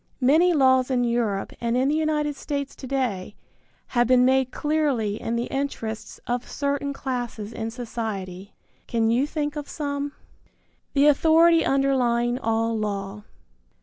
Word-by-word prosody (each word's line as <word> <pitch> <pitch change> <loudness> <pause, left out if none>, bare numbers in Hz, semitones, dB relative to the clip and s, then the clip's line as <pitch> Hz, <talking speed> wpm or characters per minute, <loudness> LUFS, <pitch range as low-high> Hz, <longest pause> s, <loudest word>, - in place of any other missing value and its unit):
Many 315 +8 +5
laws 260 -4 +4
in 250 -2 +1
Europe 235 -5 -1
and 235 +1 0
in 260 +1 +2
the 290 - +2
United 305 -2 0
States 280 -1 -4
to 265 - -9
day 235 -8 -2 0.5
have 240 -2 +2
been 250 0 +5
made 260 0 +3
clearly 280 -9 0
in 230 - -2
the 235 - 0
interests 240 -5 -4
of 245 0 -3
certain 280 0 -2
classes 245 -5 -4
in 225 0 -4
society. 215 -5 -6 0.3
Can 225 -1 +1
you 255 +5 +2
think 295 -1 -3
of 295 -1 -6
some? 285 -2 -3
III. 290 - -6 0.8
THE 280 0 +4
AUTHORITY 325 +3 +5
UNDERLYING 250 -3 +1
ALL 225 -1 0
LAW. 205 -1 -3
255 Hz, 150 wpm, -24 LUFS, 225-285 Hz, 0.8 s, Many